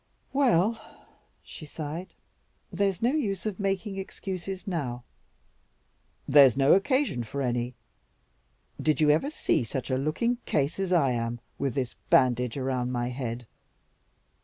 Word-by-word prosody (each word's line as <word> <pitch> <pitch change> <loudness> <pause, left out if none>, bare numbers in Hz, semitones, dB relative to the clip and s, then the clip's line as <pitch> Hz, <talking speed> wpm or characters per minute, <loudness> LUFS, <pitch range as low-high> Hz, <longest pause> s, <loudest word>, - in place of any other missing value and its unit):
"Well," 230 -5 +3 0.6
she - - -10
sighed, 155 +4 -6 0.6
"there's 200 -1 0
no 240 - +4
use 215 - -1
of 215 -3 -3
making 195 0 -2
excuses 190 -1 -5
now." 135 - -3 1.2
"There's 135 -3 +7
no 135 0 +5
occasion 260 - +2
for 135 +5 -6
any. 120 0 -1 1.1
Did 155 0 +2
you 150 -1 +5
ever 160 - +2
see 305 - 0
such 130 +4 -4
a 130 - +2
looking 235 - 0
case 145 +5 0
as 190 -2 -1
I 155 -8 +4
am 120 0 -2 0.2
with 135 -4 -1
this 130 -3 -2 0.2
bandage 125 -1 +3
around 130 -2 -1
my 120 -1 -1
head?" 120 -2 -4
150 Hz, 135 wpm, -27 LUFS, 125-195 Hz, 1.2 s, There's